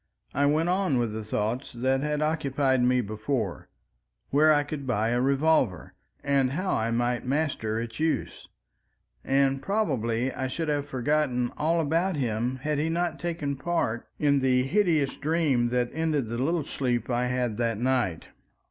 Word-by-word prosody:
I 140 +1 +2
went 155 +3 +2
on 185 -6 +1
with 120 -3 0
the 110 0 -4
thoughts 110 +5 -2
that 130 +2 0
had 150 +1 -1
occupied 140 -4 +1
me 125 0 +3
before—where 105 - -2
I 145 -1 +4
could 145 -2 -6
buy 110 -2 +1
a 120 +1 +1
revolver, 135 - +1 0.3
and 135 -2 +2
how 185 +5 -1
I 110 +1 0
might 120 +1 0
master 130 -6 -1
its 115 +1 -6
use—and 135 - -3
probably 130 - 0
I 130 - -2
should 160 +4 -3
have 145 -1 -1
forgotten 130 -2 0
all 165 +3 +1
about 165 +4 +1
him 120 -2 -1
had 150 -1 0
he 155 +2 0
not 170 0 -1
taken 165 -5 -2
a - - -2
part 165 -10 -1
in 140 -2 +3
the 130 -1 +2
hideous 160 -3 +1
dream 145 -6 +1
that 125 0 0
ended 155 -7 0
the 115 +1 -3
little 160 +4 +1
sleep 120 -4 -1
I 125 +1 +1
had 125 -3 -1
that 115 -2 0
night. 120 -8 0
135 Hz, 160 wpm, -27 LUFS, 120-150 Hz, 0.3 s, I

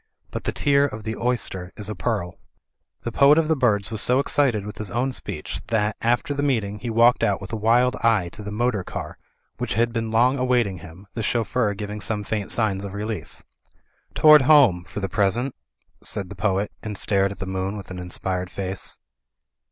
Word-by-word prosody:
But - - -5
the - - 0
tear 140 0 +3
of 110 -5 -8
the 110 +2 -3
oyster 115 -7 -2
is 105 - -3
a 105 - -2
pearl.'* 95 -3 -3 0.6
The 120 - -3
Poet 140 +6 +6
of 165 -1 +3
the 160 - +2
Birds 110 -6 +1
was 110 - 0
so 125 - +3
excited 130 -6 +1
with 105 -2 -8
his 110 -3 -3
own 125 +6 0
speech - - -5
that, 110 -2 0
after 120 +5 +1
the 140 - -2
meeting, 110 -8 0
he 120 - -4
walked 115 +2 +4
out 100 -2 +2
with 100 +2 -9
a - - +1
wild 120 +4 +3
eye 110 -6 +2
to 105 - -10
the 105 - -6
motor 110 -1 0
car, - - -7 0.4
which - - -2
had 115 +1 +1
been 115 -1 -2
long 125 +4 +3
await 125 -2 +3
ing 95 -3 -5
him, 90 +4 -12
the 115 - -3
chauffeur 110 -1 0
giving 105 +1 -5
some 105 +1 -2
faint 105 -1 -3
signs 100 -4 0
of 100 0 -6
relief. 105 +1 -5 0.7
"Toward 155 -1 +8
home, 130 - +5
for 105 - -6
the 95 - -1
present," 105 +7 0 0.5
said 100 -4 -4
the 100 - -8
poet, 100 +1 0
and 105 -2 -5
stared 100 -1 +1
at 100 - -8
the - - -5
moon 95 +2 -3
with 95 -2 -9
an 90 - -6
inspired 90 +1 -3
face. 95 +1 -4
105 Hz, 205 wpm, -23 LUFS, 100-120 Hz, 0.7 s, Toward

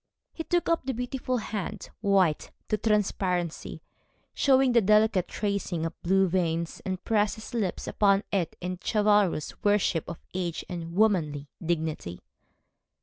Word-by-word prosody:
He 325 - -5
took 350 +1 0
up 335 - +1
the 265 -1 -3
beautiful 250 +1 -2
hand, 210 -2 -5
white 190 -6 +2 0.2
to 215 - +2
transparency, 190 -6 -1 0.5
showing 265 -2 +4
the 235 -1 +5
delicate 210 -2 +3
tracing 200 -5 -2
of 165 - -3
blue 190 +2 +3
veins, 170 -2 -1
and 185 -1 -3
pressed 210 -2 +1
his 220 +1 -10
lips 210 -6 -2
upon 200 -1 +3
it 180 -5 -1
in 180 +1 -4
chivalrous 205 -7 +1
worship 205 -6 +2
of 170 - -6 0.2
age 175 -3 -3
and 170 -2 -6
womanly 160 -9 +1
dignity. 160 - -2
195 Hz, 140 wpm, -27 LUFS, 170-215 Hz, 0.5 s, the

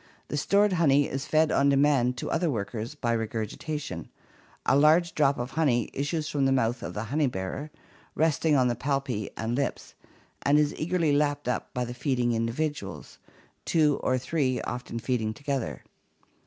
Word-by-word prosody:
The 145 - -2
stored 200 +6 +3
honey 145 -5 +4
is 135 +2 -4
fed 155 0 +3
on 140 +1 +3
demand 135 -3 +3
to - - -4
the - - -3
other 170 0 +1
workers 115 +2 -4
by 120 -5 -1
regurgitation; 115 - -4 0.6
a - - +4
large 160 +4 +4
drop 140 -2 +2
of 120 +1 -4
honey 135 -7 +1
issues 150 +3 -2
from 140 -3 0
the - - +2
mouth 120 -2 +1
of - - -6
the 105 - -2
honey 145 +6 +1
bearer, 110 +7 -4 0.5
resting 160 -1 +2
on 130 -2 +4
the 120 - 0
palpi 130 -5 -2
and 115 +1 -2
lips, 140 +1 -2 0.5
and 145 +1 +3
is 150 0 +2
eagerly 165 -1 0
lapped 145 -1 +1
up 125 - -2
by 125 0 0
the 120 - -6
feeding 125 -2 0
individuals, 120 +7 -3 0.4
two 150 -3 +3
or 130 - +1
three 130 -1 0
often 120 -1 -5
feeding 110 -3 -1
together. 140 -4 -3
140 Hz, 170 wpm, -27 LUFS, 120-150 Hz, 0.6 s, honey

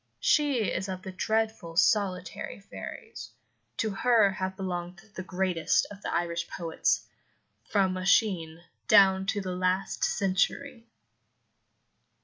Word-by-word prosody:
She 285 -6 +2
is 190 - -3
of 185 0 -5
the 190 - -6
dreadful 220 -3 -1
solitary 185 -2 +1
fairies. 450 - -9 0.5
To 220 -2 0
her 220 0 +3
have 190 0 -4
belonged 180 -2 -4
the 185 - -5
greatest 185 -2 0
of 205 0 -11
the - - -4
Irish 170 0 -1
poets, 165 -3 -1 0.6
from 190 -3 +1
Oisin 185 -3 +1 0.3
down 190 -2 +5
to 205 0 0
the 185 -1 -4
last 185 +1 -1
century. 230 +6 0
190 Hz, 120 wpm, -28 LUFS, 180-210 Hz, 0.6 s, down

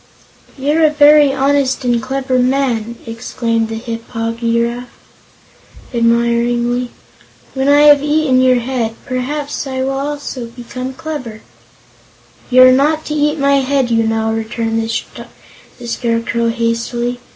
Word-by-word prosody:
"You're 295 +4 +1
a 310 - +6
very 295 -1 +5
honest 270 -1 0
and 240 -1 +1
clever 260 0 -1
man!" 250 -3 0
exclaimed 230 0 -2
the 225 - -4
Hip 230 0 -6
po 225 -1 -3
gy 230 0 -1
raf, 240 +1 -4 1.0
admiringly. 235 +1 +1 0.6
"When 265 +1 0
I 290 +1 +5
have 290 -1 +7
eaten 295 -3 +2
your 255 -1 +3
head, 235 -3 -2
perhaps 280 +3 -3
I 260 -1 -3
also 275 +1 -3
will 235 - -5
become 255 +2 -7
clever." 260 -8 -6 1.1
"You're 255 0 +7
not 300 +4 +2
to 300 - -4
eat 300 +1 +1
my 280 -1 +3
head, 270 -2 0
you 225 0 +3
know," 220 0 0
returned 225 0 -2
the 230 +1 -8
Scarecrow 230 0 -1
hastily. 235 +1 -2
250 Hz, 130 wpm, -16 LUFS, 230-275 Hz, 1.1 s, have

